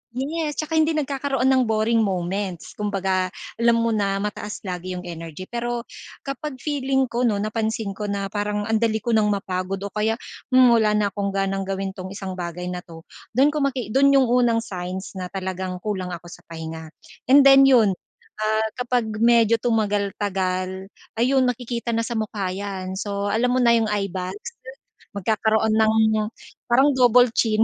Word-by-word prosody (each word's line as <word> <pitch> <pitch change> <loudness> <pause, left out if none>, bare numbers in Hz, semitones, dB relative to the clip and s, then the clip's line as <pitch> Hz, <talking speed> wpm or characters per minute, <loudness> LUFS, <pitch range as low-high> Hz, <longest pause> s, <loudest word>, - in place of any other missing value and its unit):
yes, 300 +3 -2
tsaka 310 +1 -2
hindi 315 0 +2
nagkakaroon 275 -3 -1
ng 260 -1 +4
boring 220 +1 +2
moments. 185 -1 -3
Kumbaga, 190 -3 0 0.3
alam 235 0 +4
mo 230 - +1
na 200 -1 0
mataas 210 0 -5
lagi 180 0 -4
'yung 180 - -6
energy. 165 0 -7
Pero 240 0 -3 0.4
kapag 275 +1 -4
feeling 270 -3 0
ko 240 +1 0
'no, 210 - +1
napansin 220 0 -2
ko 210 - -6
na 200 -1 -2
parang 205 0 -2
ang 225 - +1
dali 220 -1 +1
ko 235 - -1
nang 215 -1 +3
mapagod 190 -1 -2
o - - -12
kaya, 220 +1 +1 0.4
hmm, 255 -2 +7
wala 220 -2 +3
na 210 -1 +2
akong 200 -1 -2
ganang 195 0 0
gawin 195 0 -2
itong 185 0 -7
isang 195 -2 -5
bagay 180 0 -5
na 180 - -4
'to, 165 -1 -13 0.3
dun 270 +3 +5
ko 300 - -2
maki 255 -6 -2
dun 275 +1 +5
yung 265 -3 +5
unang 240 -1 +3
signs 185 0 -6
na 180 - -4
talagang 185 -1 -4
kulang 190 -4 -3
ako 175 0 -12
sa - - -13
pahinga. 160 0 -7 0.4
And 280 0 +8
then 270 0 +8
'yun, 230 -7 +5 0.5
ah, 220 +1 +1
kapag 245 -2 0 0.2
medyo 230 -1 +5
tumagal-tagal 200 -4 -1 0.3
ayun, 260 +2 +3
makikita 240 -1 -3
na 230 - 0
sa - - -7
mukha 210 -4 -2
'yan. 190 -2 -5
So, 200 0 -2
alam 245 +3 +1
mo - - +2
na 235 - +5
yung 225 -1 +2
eyebags. 195 +3 -3 0.6
Magkakaroon 220 +2 +1
ng 220 0 +4 0.8
parang 265 +5 +5
double-chin, 240 -3 +4
215 Hz, 170 wpm, -23 LUFS, 190-240 Hz, 0.8 s, And